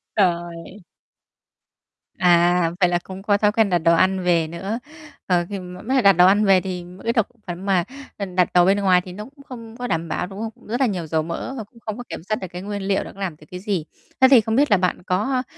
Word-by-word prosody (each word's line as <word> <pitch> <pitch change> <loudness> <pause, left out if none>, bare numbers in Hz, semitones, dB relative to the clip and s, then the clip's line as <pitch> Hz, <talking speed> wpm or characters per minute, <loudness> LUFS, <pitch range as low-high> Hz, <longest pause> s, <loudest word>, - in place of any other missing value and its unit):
Trời! 175 0 -1 1.4
À, 175 -1 +4
vậy 180 - +5
là 175 0 +1
cũng 190 0 -9
có 205 0 +2
thói 210 0 +2
quen 220 -3 +2
đặt 175 - +3
đồ 165 +1 +3
ăn 190 +2 +2
về 170 -3 +2
nữa. 195 +7 -4 0.5
Ờ, 175 -2 +1
khi 200 - -4
mà 180 0 -9
mới 260 +5 -1
cả 260 - +3
đặt 200 -1 +7
đồ 180 +1 +5
ăn 205 +3 +4
về 195 -2 +5
thì 180 -2 -5 0.2
cái 230 - +1
thực 225 -4 +1 0.2
phẩm 180 +2 -6
mà, 185 -3 +2 0.3
ừm, 195 -3 -5
đặt 180 -1 +4
đồ 175 -1 +6
bên 195 +2 +3
ngoài 185 -2 +4
thì 180 0 -10
nó 210 +3 -7
cũng 280 +3 -17
không 230 -2 -10
có 245 - -4
đảm 165 -6 -2
bảo, 180 - -2
đúng 195 +2 -9
không? 225 0 -7
Rất 240 +4 -3
là 265 - +4
nhiều 180 -7 -3
dầu 160 0 0
mỡ 170 +10 -5
và 225 - -5
cũng 230 +3 -21
không 215 -2 -5
có - - -5
kiểm - - -7
soát 215 - +1
được 190 - -4
cái 180 +1 -7
nguyên 205 0 -5
liệu 195 0 0
nó - - -10
làm 195 -5 -4
được 150 - -18
cái 180 - -7
gì. 190 -5 -2 0.4
Thế 260 - +7
thì 260 -4 +8
không 225 +1 -1
biết 285 -2 +3
là 205 - +6
bạn 180 -1 -1
có, 185 +3 0
a, 255 -1 +1
190 Hz, 265 wpm, -22 LUFS, 175-210 Hz, 1.4 s, thì